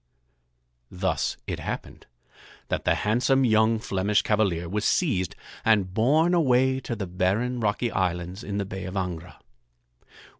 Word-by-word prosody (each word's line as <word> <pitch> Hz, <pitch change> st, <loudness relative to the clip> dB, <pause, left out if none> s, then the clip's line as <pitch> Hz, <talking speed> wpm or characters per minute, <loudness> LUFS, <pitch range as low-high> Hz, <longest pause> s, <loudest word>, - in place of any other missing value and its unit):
Thus 90 Hz, -2 st, -1 dB
it -, -, -4 dB
happened -, -, -6 dB, 0.6 s
that -, -, -2 dB
the -, -, +3 dB
handsome 125 Hz, +5 st, +2 dB
young 110 Hz, 0 st, +3 dB
Flemish 100 Hz, -2 st, 0 dB
cavalier 95 Hz, -6 st, +1 dB
was 105 Hz, +4 st, -2 dB
seized 100 Hz, -, +1 dB, 0.3 s
and 100 Hz, -5 st, +2 dB
borne 150 Hz, -, +3 dB
away 130 Hz, -5 st, +3 dB
to 125 Hz, -2 st, -4 dB
the 100 Hz, -3 st, -4 dB
barren 95 Hz, +8 st, 0 dB
rocky 110 Hz, +2 st, 0 dB
islands 90 Hz, +1 st, -2 dB
in 100 Hz, 0 st, -4 dB
the 100 Hz, -, -1 dB
Bay 95 Hz, -1 st, -6 dB
of 95 Hz, +1 st, -6 dB
Angra. 90 Hz, -2 st, -4 dB
105 Hz, 140 wpm, -26 LUFS, 95-120 Hz, 0.6 s, the